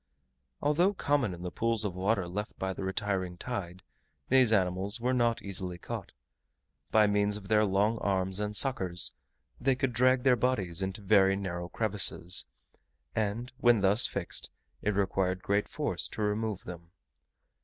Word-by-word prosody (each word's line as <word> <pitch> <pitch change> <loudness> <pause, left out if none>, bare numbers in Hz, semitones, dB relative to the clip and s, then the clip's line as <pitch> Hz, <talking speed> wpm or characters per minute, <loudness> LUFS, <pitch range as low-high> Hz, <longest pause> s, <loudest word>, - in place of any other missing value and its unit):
Although 175 +7 +2
common 145 - +1
in 90 0 -8
the 90 - -4
pools 115 0 -1
of 100 - -2
water 95 0 0
left 105 +4 -5
by 95 0 -2
the 95 - -6
retiring 95 -2 -2
tide, 95 -6 -6 0.5
these 130 -3 +5
animals 95 +2 0
were 125 +2 0
not 120 -2 +1
easily 90 -2 -4
caught. - - -7 0.8
By 110 -1 +5
means 105 0 +1
of 100 -2 -11
their 110 -1 +4
long 105 +3 +1
arms 95 -1 -1
and 105 0 -3
suckers, 95 -10 +3 0.5
they 135 -1 +2
could 130 -1 -1
drag 130 +2 +3
their 130 -2 +5
bodies 105 -8 0
into 95 +2 -3
very 95 -1 +4
narrow 90 -3 -4
crevices; 100 -4 +2 0.7
and 110 +3 -2
when 120 -3 +4
thus 100 +5 +4
fixed, 100 -3 -3 0.3
it 105 -1 -1
required 95 -2 0
great 100 +1 0
force - - -2
to 110 - -5
remove 105 -1 -2
them. 85 -1 -10
100 Hz, 155 wpm, -30 LUFS, 95-115 Hz, 0.8 s, these